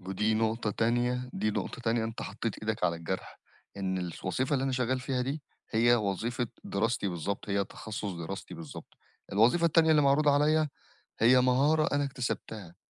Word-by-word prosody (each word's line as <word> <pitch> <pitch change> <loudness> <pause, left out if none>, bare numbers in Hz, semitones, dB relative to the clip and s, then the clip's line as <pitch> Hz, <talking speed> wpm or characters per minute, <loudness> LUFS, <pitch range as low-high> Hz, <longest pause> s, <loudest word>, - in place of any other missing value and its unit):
ودي 95 +4 0
نقطة 110 0 0
تانية، 120 +3 0
دي 110 - 0
نقطة 120 - -4
تانية 115 -1 +1
أنت 110 0 -5
حطيت 105 +2 -4
إيدك 110 +1 -2
على 85 - +1
الجرح 85 +3 -5 0.4
إن 95 -1 -1
الس 90 0 -6
وظيفة 130 +10 0
اللي 135 -1 +1
أنا 135 - 0
شغّال 130 0 0
فيها 125 0 -1
دي 140 +3 -3 0.3
هي 120 +2 +4
وظيفة 115 +3 -1 0.2
دراستي 105 0 0
بالضبط، 90 +4 -4
هي 100 0 +1
تخصص 105 -1 -6
دراستي 85 +3 -6
بالضبط، 80 -3 -10 0.4
الوظيفة 120 - +4
التانية 160 0 +4
اللي 150 -1 +5
معروضة 145 +1 +4
عليَّ 150 +2 +3 0.5
هي 125 +3 +6
مهارة 140 +5 +3
أنا 145 - +2
اكتسبتها، 110 -8 -4
115 Hz, 165 wpm, -30 LUFS, 100-130 Hz, 0.5 s, هي